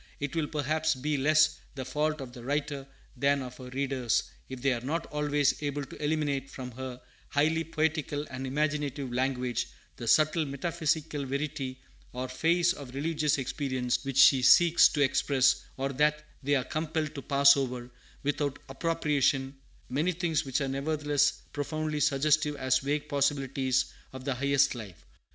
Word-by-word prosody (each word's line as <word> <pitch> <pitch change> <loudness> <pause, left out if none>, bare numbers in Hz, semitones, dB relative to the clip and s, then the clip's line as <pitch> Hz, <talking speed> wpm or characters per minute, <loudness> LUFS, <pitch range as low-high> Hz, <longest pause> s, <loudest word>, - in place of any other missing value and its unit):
It 145 +2 -4
will, 160 -2 0
perhaps, 155 +1 0
be 150 +4 -1
less 155 +3 +3 0.2
the 130 -2 -5
fault 150 +2 -1
of 125 -2 -8
the 120 - -10
writer 145 0 -2 0.3
than 140 +1 +1
of 125 -1 -9
her 130 -1 -9
readers, 130 -2 0 0.3
if 130 -1 -6
they 135 -2 +3
are 120 - -4
not 160 +6 -2
always 145 -1 +1
able 145 -1 -2
to 150 - -10
eliminate 145 -3 0
from 130 -2 -7
her 130 +1 -7 0.3
highly 160 +3 +2
poetical 155 -2 -1
and 130 +1 -5
imaginative 145 -2 -1
language 125 -1 -1 0.3
the 120 - -6
subtle 155 +5 +4
metaphysical 155 0 -2
verity 135 -1 -3 0.3
or 125 +1 -3
phase 170 +6 +2
of 135 -7 -10
religious 150 0 0
experience 130 -2 -1
which 135 -1 -4
she 135 -1 +7
seeks 170 +6 +7
to 145 - -1
express, 135 -1 +2
or 135 +1 -1
that 150 +2 +1 0.2
they 145 +1 +1
are 130 - +1
compelled 155 +1 -2
to 140 - -6
pass 140 +2 +6
over, 125 -3 -3 0.3
without 145 -1 -1
appropriation, 140 -3 0 0.3
many 155 +8 0
things 165 -4 -1
which 135 +2 -1
are 135 - 0
nevertheless 145 +1 0
profoundly 155 +1 -2
suggestive 150 +1 +2
as 130 -2 +2
vague 145 +2 -2
possibilities 135 -2 0 0.2
of 130 0 -8
the 140 - 0
highest 140 +1 +2
life. 105 -9 -10
140 Hz, 160 wpm, -29 LUFS, 130-150 Hz, 0.3 s, she